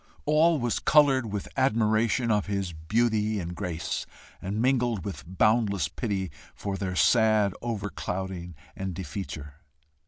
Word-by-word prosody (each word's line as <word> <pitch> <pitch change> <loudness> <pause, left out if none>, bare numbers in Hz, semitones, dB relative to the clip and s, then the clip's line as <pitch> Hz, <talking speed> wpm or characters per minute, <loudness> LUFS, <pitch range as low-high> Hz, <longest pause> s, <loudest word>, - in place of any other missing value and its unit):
All 155 +2 +4
was 120 -3 0
coloured 135 -7 +4
with 100 -1 -3
admiration 115 -1 +2
of 105 -2 +1
his 100 -3 -2
beauty 110 +5 +1
and 85 -1 -4
grace, 85 -1 -3 0.3
and 100 +3 -3
mingled 120 -6 +1
with 100 - -5
boundless 105 -3 +3
pity 95 - -3 0.2
for 100 -1 -3
their 95 -2 -3
sad 110 -2 +4
overclouding 95 -5 -4 0.2
and 95 -2 -4
defeature! 80 -6 -6
105 Hz, 125 wpm, -27 LUFS, 95-115 Hz, 0.3 s, All